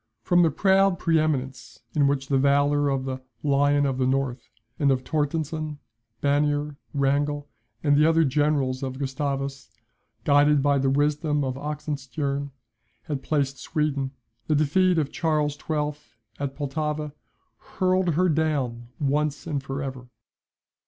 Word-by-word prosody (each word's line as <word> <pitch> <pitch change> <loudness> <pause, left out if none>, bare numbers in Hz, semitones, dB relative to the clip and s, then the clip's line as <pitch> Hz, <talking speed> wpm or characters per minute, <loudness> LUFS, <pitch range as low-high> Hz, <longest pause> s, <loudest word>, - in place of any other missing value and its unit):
From 175 -1 +4
the 165 - +5
proud 190 +3 +3
pre 165 0 +2
eminence 135 -6 -3
in 145 -2 +4
which 140 -1 0
the 135 -2 +2
valour 145 +1 +3
of 135 -1 -1
the 130 -1 -4 0.2
"Lion 145 0 +3
of 135 -1 -1
the 130 - +2
North" 130 -2 -1 0.3
and 145 - +3
of 130 -1 +1
Torstenston, 155 +1 -2 0.4
Bannier, 145 +1 +1 0.2
Wrangel 145 +1 0 0.4
and 145 -2 +4
the 150 +2 +5
other 165 0 +4
Generals 140 -2 +1
of 130 -1 -4
Gustavus, 140 0 -3 0.5
guided 145 0 +4
by 140 -1 +3
the 135 0 +2
wisdom 150 +1 +1
of 130 -1 -1
Oxenstiern, 140 -1 -3 0.5
had 145 -4 -4
placed 140 -3 -1
Sweden, 150 -4 -1 0.4
the 155 - +2
defeat 175 +5 +3
of 150 -3 0
Charles 155 -3 0
XII. 150 0 -2 0.5
at 140 -1 -3
Pultowa 150 +1 -3 0.6
hurled 185 -3 +2
her 185 +3 +3
down 145 -7 0
at 145 - -1
once 145 +1 0
and 150 -4 -2
for 140 +1 -4
ever. 130 -2 -6
145 Hz, 145 wpm, -25 LUFS, 135-150 Hz, 0.6 s, the